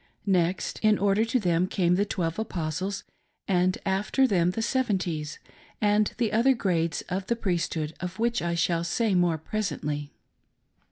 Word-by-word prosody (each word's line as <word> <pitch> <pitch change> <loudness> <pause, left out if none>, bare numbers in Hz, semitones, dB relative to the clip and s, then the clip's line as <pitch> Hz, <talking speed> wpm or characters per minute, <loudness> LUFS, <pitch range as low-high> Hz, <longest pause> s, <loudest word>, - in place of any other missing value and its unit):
Next 185 -2 0
in 215 -1 +4
order 200 +2 +2
to 240 +2 +1
them 175 -3 +1
came 180 -2 +1
the 200 +3 +2
"Twelve 165 -2 -2
Apostles," 185 -1 -3 0.4
and 185 -1 +2
after 200 +7 +2
them 180 -8 +2
the 225 +5 -2
"Seven 250 -4 +1
ties," 155 -5 -4 0.4
and 210 0 +2
the 230 -3 0
other 250 +4 +4
grades 170 -7 0
of 190 +2 -3
the 235 - +1
Priesthood, 170 -7 -2
of 180 +1 -5
which 235 +1 0
I 170 0 -1
shall 170 0 +1
say 215 +5 0
more 175 -3 +3
presently. 150 -6 -3
185 Hz, 160 wpm, -27 LUFS, 170-215 Hz, 0.4 s, in